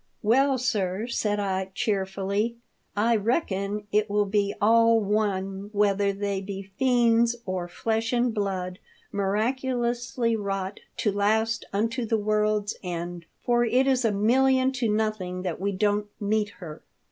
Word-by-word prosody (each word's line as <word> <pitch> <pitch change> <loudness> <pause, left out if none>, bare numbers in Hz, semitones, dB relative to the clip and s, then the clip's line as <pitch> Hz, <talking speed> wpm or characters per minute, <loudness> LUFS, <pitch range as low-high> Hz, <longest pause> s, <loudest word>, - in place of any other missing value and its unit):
" - - -45
Well, 270 +1 +3
sir," 210 -4 -1
said 210 -3 -1
I, 190 -1 -1
cheerfully, 200 +2 -1 0.2
" - - -45
I 230 +3 +3
reckon 210 - -1
it 210 +1 +2
will 205 0 +2
be 200 0 0
all 230 +1 +5
one 200 -2 -1
whether 200 -1 +2
they 200 -1 -2
be 195 0 -7
fiends, 235 -2 +3
or 185 -2 -3
flesh 225 +5 -1
and 245 -1 +1
blood 190 -3 -2 0.3
miraculously 240 +3 0
wrought 195 -2 -3 0.2
to 210 - +1
last 220 +3 +1
unto 230 +5 -1
the 225 - +2
world's 210 0 0
end, 175 -1 -5 0.2
for 240 0 +3
it 250 +3 +3
is 260 -2 +2
a 225 - +3
million 260 +5 +3
to 245 -4 -1
nothing 210 -4 -1
that 180 -1 -3
we 200 +1 0
don't 205 +1 0
meet 210 0 0
her. 160 -5 -9
210 Hz, 145 wpm, -26 LUFS, 195-230 Hz, 0.3 s, all